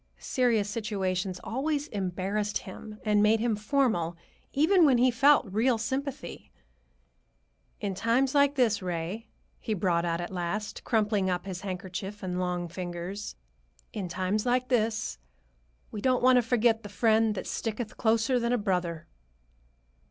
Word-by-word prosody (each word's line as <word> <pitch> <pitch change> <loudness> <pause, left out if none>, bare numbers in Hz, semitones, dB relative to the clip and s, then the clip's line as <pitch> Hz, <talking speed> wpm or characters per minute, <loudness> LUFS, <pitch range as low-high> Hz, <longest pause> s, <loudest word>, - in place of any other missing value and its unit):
Serious 235 -5 +1
situations 195 -4 -2
always 290 +4 -1
embarrassed 200 +2 -2
him 210 +3 -10
and 210 -1 +3
made 215 +1 +4
him 230 -1 +1
formal, 210 - 0 0.3
even 335 +6 +4
when 275 -5 +5
he 250 +1 +4
felt 280 +4 +5
real 225 +5 +1
sympathy. 270 +4 -4 1.3
"In 200 -2 -2
times 235 +7 +1
like 285 0 +4
this, 230 -6 +2
Ray," 180 +5 -4 0.3
he 220 - -2
brought 175 -3 +1
out 170 -1 -1
at 175 +2 -5
last, 185 +4 -3
crumpling 210 -4 +1
up 180 0 -2
his 185 -2 -5
handkerchief 190 +1 -6
in 185 - -3
his 180 - -2
long 180 -1 -1
fingers,—"in 170 - -7
times 185 +4 -1
like 250 0 +1
this, 220 - 0 0.7
we 210 - -5
don't 255 0 +2
want 255 0 +6
to - - +5
forget 230 -1 +2
the 205 - -9
Friend 220 0 +2
that - - -4
sticketh 225 0 -4
closer 230 +3 +2
than 235 0 0
a - - +3
brother." 180 -6 -1
210 Hz, 145 wpm, -28 LUFS, 185-240 Hz, 1.3 s, want